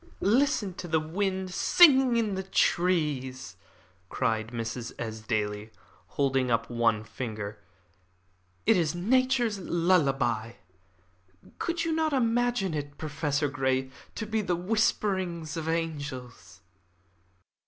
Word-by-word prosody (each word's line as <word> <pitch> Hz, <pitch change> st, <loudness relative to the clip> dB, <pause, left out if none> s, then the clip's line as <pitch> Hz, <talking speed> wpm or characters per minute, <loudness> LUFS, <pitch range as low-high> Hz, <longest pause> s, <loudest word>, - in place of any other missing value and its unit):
"Listen 230 Hz, -2 st, +2 dB
to 175 Hz, -, -6 dB
the 160 Hz, -1 st, +2 dB
wind 190 Hz, +3 st, -2 dB
sighing 265 Hz, -, +6 dB
in 220 Hz, -3 st, 0 dB
the 190 Hz, -, -2 dB
trees!" 150 Hz, -9 st, 0 dB, 0.5 s
cried 110 Hz, -1 st, -1 dB
Mrs. 115 Hz, 0 st, -5 dB
Esdaile, 110 Hz, -2 st, -3 dB, 0.5 s
holding 135 Hz, -3 st, +1 dB
up 115 Hz, 0 st, 0 dB
one 115 Hz, -2 st, +1 dB
finger. 110 Hz, -2 st, -6 dB, 1.1 s
"It 225 Hz, -1 st, +5 dB
is 165 Hz, -2 st, 0 dB
Nature's 240 Hz, +2 st, +2 dB
lullaby. 140 Hz, -, +1 dB, 1.1 s
Could 345 Hz, -1 st, -1 dB
you 330 Hz, -, 0 dB
not 315 Hz, -1 st, +1 dB
imagine 240 Hz, -6 st, +1 dB
it, 145 Hz, -1 st, -5 dB
Professor 150 Hz, -1 st, -1 dB
Grey, 130 Hz, -1 st, -1 dB, 0.2 s
to 220 Hz, -, -4 dB
be 220 Hz, +1 st, -1 dB
the 180 Hz, -3 st, 0 dB
whisperings 185 Hz, -4 st, 0 dB
of 160 Hz, -1 st, -3 dB
angels?" 130 Hz, -, -5 dB
160 Hz, 110 wpm, -28 LUFS, 125-205 Hz, 1.1 s, sighing